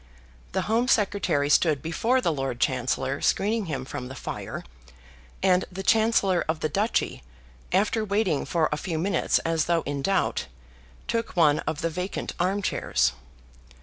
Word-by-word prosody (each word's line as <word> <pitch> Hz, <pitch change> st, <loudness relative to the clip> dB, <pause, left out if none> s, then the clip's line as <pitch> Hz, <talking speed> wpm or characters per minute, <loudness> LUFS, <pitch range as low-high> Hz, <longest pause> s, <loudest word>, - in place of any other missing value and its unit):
The -, -, 0 dB
Home 230 Hz, +3 st, +1 dB
Secretary 195 Hz, -, +2 dB
stood 150 Hz, 0 st, +3 dB
before 230 Hz, +11 st, +1 dB
the 170 Hz, -, +1 dB
Lord 135 Hz, -4 st, -3 dB
Chancellor 130 Hz, +2 st, 0 dB
screening 210 Hz, 0 st, +1 dB
him 135 Hz, -4 st, -3 dB
from 130 Hz, -2 st, -6 dB
the 130 Hz, -, -8 dB
fire, -, -, -6 dB, 0.8 s
and 185 Hz, -1 st, +4 dB
the 190 Hz, +2 st, -6 dB
Chancellor 215 Hz, -4 st, +3 dB
of 160 Hz, 0 st, -1 dB
the 155 Hz, -, 0 dB
Duchy, 195 Hz, -, 0 dB, 0.5 s
after 210 Hz, +4 st, +2 dB
waiting 200 Hz, -7 st, +1 dB
for 165 Hz, -3 st, +1 dB
a 150 Hz, -, 0 dB
few 165 Hz, +1 st, -3 dB
minutes 185 Hz, +3 st, +1 dB
as 165 Hz, -1 st, +1 dB
though 170 Hz, -1 st, +1 dB
in 140 Hz, 0 st, -3 dB
doubt, 195 Hz, -, 0 dB, 0.6 s
took 230 Hz, -4 st, -2 dB
one 150 Hz, -3 st, +5 dB
of 160 Hz, +1 st, -2 dB
the 165 Hz, -, 0 dB
vacant 180 Hz, +4 st, -4 dB
armchairs. 190 Hz, +3 st, +1 dB
170 Hz, 150 wpm, -26 LUFS, 145-200 Hz, 0.8 s, one